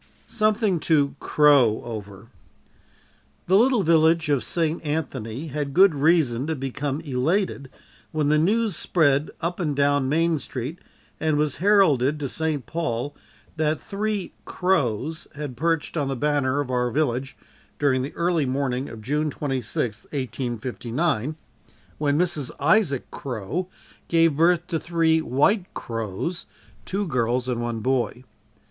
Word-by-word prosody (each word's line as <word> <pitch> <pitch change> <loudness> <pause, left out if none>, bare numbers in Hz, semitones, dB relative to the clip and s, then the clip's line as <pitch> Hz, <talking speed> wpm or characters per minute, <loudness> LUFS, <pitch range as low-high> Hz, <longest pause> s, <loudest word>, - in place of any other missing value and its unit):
Something 215 -4 +1
to 145 -3 +3
Crowe 140 -7 +4
Over. 105 -2 -8 1.2
The 185 - +3
little 240 0 +4
village 160 -1 +3
of 140 -3 +2
St. 165 -1 -1
Anthony 145 -3 -3
had 145 -1 -4
good 190 -1 +7
reason 145 -4 +2
to 160 - -1
become 140 +2 -3
elated 145 +1 -1 0.4
when 150 -2 0
the 150 0 +4
news 210 +4 +1
spread 145 -4 +2
up 175 +2 -2
and 150 -5 -1
down 140 -1 +2
Main 165 +1 +2
street 135 +5 -5 0.4
and 155 -2 +1
was 150 -2 0
heralded 155 -8 +3
to 145 - -2
St. 155 -2 -2
Paul, 145 -1 -3 0.4
that 155 -1 +1
three 205 -1 -3
"Crowes" 160 - -1
had 145 -3 -5
perched 165 +4 -1
on 145 -4 0
the 135 - -2
banner 145 0 +1
of 130 -3 -5
our 125 -1 +1
village 135 -1 -1 0.4
during 135 -3 +2
the 135 - -5
early 170 -4 +1
morning 130 0 -1
of 110 -1 -10
June 150 +5 0
26th, 125 -6 -3
1859, 130 +2 -2 0.6
when 145 -1 +1
Mrs. 165 -6 0
Isaac 150 - +2
Crowe 135 - -4 0.4
gave 165 -3 +3
birth 170 +2 +3
to 170 -3 -2
three 165 -1 +2
white 175 - +1
Crowes, 115 - -4 0.4
two 200 +2 -2
girls 125 -4 0
and 120 -2 -1
one 120 -1 -3
boy. 125 0 -1
145 Hz, 135 wpm, -24 LUFS, 130-165 Hz, 1.2 s, good